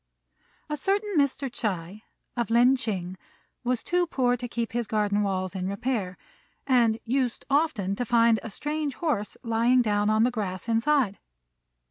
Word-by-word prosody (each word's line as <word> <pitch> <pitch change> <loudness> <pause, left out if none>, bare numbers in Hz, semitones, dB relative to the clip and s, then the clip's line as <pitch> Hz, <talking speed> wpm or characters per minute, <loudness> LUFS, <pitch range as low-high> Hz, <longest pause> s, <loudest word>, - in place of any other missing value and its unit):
A 300 0 -3
certain 400 +6 0
Mr. 280 -2 +1
Ts'ui, 205 -5 -3 0.3
of 235 -2 -1
Lin 240 +3 +5
ch'ing, 190 -7 -3 0.5
was 250 -1 0
too 355 0 +1
poor 250 -5 +1
to 245 0 -5
keep 235 -1 -3
his 235 -1 -2
garden 210 -1 +1
walls 185 -2 -1
in 185 -1 -3
repair, 200 -3 -2 0.5
and 235 -4 +3
used 250 0 -1
often 275 - +1
to - - -1
find 230 -1 +4
a - - -7
strange 295 +4 -3
horse 255 - -2
lying 235 +2 +3
down 205 -1 +1
on 215 +1 +3
the 245 - +3
grass 195 -4 -4
inside. 230 -2 +2
235 Hz, 155 wpm, -26 LUFS, 205-260 Hz, 0.5 s, Lin